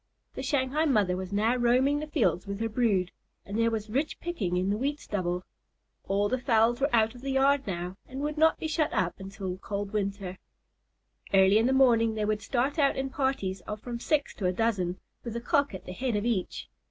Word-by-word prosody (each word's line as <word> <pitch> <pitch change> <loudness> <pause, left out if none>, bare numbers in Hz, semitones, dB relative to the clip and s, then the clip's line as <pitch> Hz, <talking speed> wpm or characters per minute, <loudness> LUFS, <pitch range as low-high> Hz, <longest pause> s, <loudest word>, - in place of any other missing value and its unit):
The - - -5
Shanghai 285 +2 +1
mother 210 - +2
was 185 0 -5
now 215 +4 +2
roaming 255 +4 +3
the 305 - -5
fields 235 - +1
with 200 0 -4
her 225 - 0
brood, 210 -6 +1 0.3
and 200 - -6
there 230 +1 +3
was 220 -2 -3
rich 275 +8 -2
picking 200 - -2
in 185 +2 +1
the - - +1
wheat 285 +3 -1
stubble. 180 -6 -2 0.6
All 200 +1 +2
the 255 +4 -1
fowls 235 0 +2
were 280 - +3
out 225 -1 +3
of 245 - -13
the 275 - -4
yard 275 0 +3
now, 180 0 -4
and 260 +1 -7
would 300 +1 -2
not 320 +1 +4
be - - -3
shut 310 -1 0
up 180 0 0
until 195 -1 -5
cold 200 +1 -4
weather. 200 -3 -3 1.0
Early 190 +2 +6
in 230 - +3
the - - +2
morning 235 -4 +4
they 215 -1 -1
would 210 0 0
start 260 +7 -1
out 280 -2 +3
in 270 0 -2
parties 265 -9 -1
of 210 0 -4
from 235 +1 -6
six 290 +3 0
to 190 - 0
a - - +2
dozen, 185 -3 0 0.3
with 235 -2 -5
a - - -1
Cock 280 +4 +1
at 190 - -9
the 180 - -6
head 245 +2 -2
of 205 +1 -1
each. 225 -6 -2
225 Hz, 220 wpm, -28 LUFS, 195-265 Hz, 1.0 s, Early